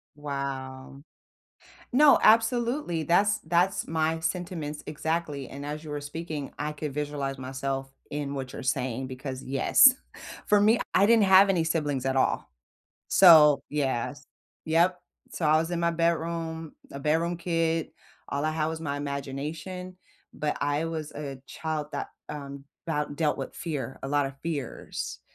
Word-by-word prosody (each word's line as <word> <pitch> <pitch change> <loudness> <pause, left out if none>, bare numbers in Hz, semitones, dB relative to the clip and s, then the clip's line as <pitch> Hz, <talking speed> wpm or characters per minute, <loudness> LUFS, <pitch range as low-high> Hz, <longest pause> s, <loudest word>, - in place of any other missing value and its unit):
Wow. 140 -2 -5 0.9
No, 285 +3 +6
absolutely. 230 - +3
That's 200 +6 +3
that's 175 +4 +1
my 160 0 0
sentiments 160 -3 -4
exactly. 150 -2 -3
And 140 +1 -7
as 150 +2 -5
you 155 - -9
were 145 0 -4
speaking, 150 -1 -5
I 150 +1 -2
could 150 -1 -5
visualize 145 -2 -3
myself 135 +1 -4 0.2
in 145 -1 -3
what 130 -2 -5
you're - - -6
saying 130 0 -1
because, 130 0 -6
yes, 140 - +6 0.5
for 210 -1 +5
me, 220 +3 +4
I 195 - +5
didn't 225 0 +5
have 190 +1 +7
any 180 -4 +2
siblings 150 -5 -1
at 135 0 0
all. 135 - +1 0.6
So, 155 -6 +8
yes. 145 0 -2 0.4
Yep. 175 +3 +3 0.3
So 165 - -1
I 155 +1 +5
was 165 +2 0
in 175 -1 -1
my 170 0 +2
bedroom, 165 -1 -1 0.2
a 140 - -6
bedroom 165 +4 +1
kid. 165 -1 0 0.4
All 140 +1 -2
I 155 - +1
had 155 -1 -1
was 160 0 -4
my 145 -3 -3
imagination, 150 +6 -5 0.4
but 150 - -2
I 145 +2 0
was 160 -2 -4
a 145 -2 -6
child 155 +2 -4
that, - - -3 0.2
um, 140 -2 -7 0.2
'bout 150 -2 -2
dealt 150 -2 +1
with - - -5
fear, 135 -7 -4
a 135 - -4
lot 145 0 +2
of 135 0 -9
fears. 135 - -5
150 Hz, 155 wpm, -27 LUFS, 140-170 Hz, 0.9 s, So